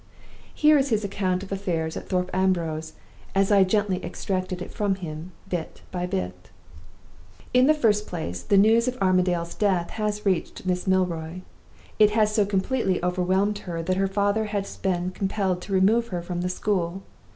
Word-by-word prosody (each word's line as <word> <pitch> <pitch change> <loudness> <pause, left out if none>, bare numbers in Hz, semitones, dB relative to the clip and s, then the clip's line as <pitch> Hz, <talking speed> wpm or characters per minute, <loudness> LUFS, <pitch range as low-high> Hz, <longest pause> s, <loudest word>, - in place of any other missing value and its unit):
"Here 300 -1 +5
is 275 +1 0
his 215 -3 +1
account 190 -2 -1
of 200 - -10
affairs 170 -5 -2
at - - -7
Thorpe 180 -1 0
Ambrose, 170 -4 0 0.4
as 195 +1 +3
I 200 -1 +6
gently 195 -1 0
extracted 185 -1 -3
it 180 - -7
from 205 -3 0
him 165 -1 -7 0.2
bit 170 -3 -5
by 180 -1 -2
bit: 90 - -4 1.0
"In 250 +1 +5
the 310 - +5
first 210 -7 +2
place, 90 - -4
the 200 - +2
news 225 +4 +5
of 255 0 -1
Armadale's 180 -2 +1
death 185 -5 0
has 210 -1 -2
reached 185 -1 -1
Miss 180 0 -1
Milroy. 180 -2 0 0.6
It 210 -1 +7
has 215 -1 +3
so 210 -2 +2
completely 195 0 0
overwhelmed 185 +3 +1
her 170 -4 -5
that 185 +2 0
her 195 0 +2
father 205 +2 +1
has 205 -2 -3
been 180 -1 -1
compelled 190 -1 -1
to 200 - -9
remove 215 +5 +3
her 175 -5 -4
from 175 0 -3
the 180 - -1
school. 185 -1 -1
190 Hz, 175 wpm, -25 LUFS, 180-205 Hz, 1.0 s, It